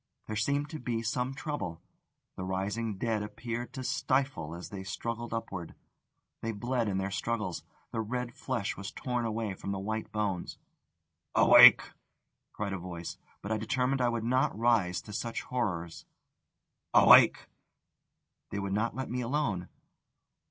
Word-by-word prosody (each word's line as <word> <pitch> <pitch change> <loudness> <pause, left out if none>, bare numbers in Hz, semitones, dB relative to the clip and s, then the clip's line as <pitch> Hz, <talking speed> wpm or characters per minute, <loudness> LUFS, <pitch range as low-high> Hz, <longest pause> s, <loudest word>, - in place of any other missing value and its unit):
There 110 - -4
seemed 140 +7 0
to 155 - -5
be 115 -2 -2
some 125 +4 -1
trouble: 115 - -4 0.6
the 95 - -5
rising 100 +3 -2
dead 110 0 0
appeared 115 +3 -5
to 130 - -5
stifle 130 - 0
as 85 - -8
they 95 -2 -6
struggled 115 +4 -4
upward, 95 -7 -5 0.7
they 115 - -2
bled 120 +2 -1
in 95 -2 0
their 95 +1 -2
struggles, 105 -3 -2 0.3
the 115 - -1
red 125 +2 -3
flesh 120 -7 -2
was 100 0 -6
torn 125 -2 -2
away 110 -2 -2
from 95 - -7
the 100 - -2
white 110 +3 -3
bones. 100 -5 -2 0.8
"Awake!" - - +9 0.6
cried 100 -2 -3
a 95 - -3
voice; 85 -1 -7 0.2
but 100 - -4
I 110 - +2
determined 125 +4 0
I 120 - +3
would 115 -1 -2
not 130 -1 +1
rise 110 -6 +2
to 105 - -10
such 115 +1 -3
horrors. 85 -9 -3 0.9
"Awake!" - - +8 1.0
They - - -4
would 100 -1 -2
not 110 +3 0
let 130 0 -3
me 125 0 -1
alone. 115 -8 -1
110 Hz, 150 wpm, -30 LUFS, 100-120 Hz, 1.0 s, Awake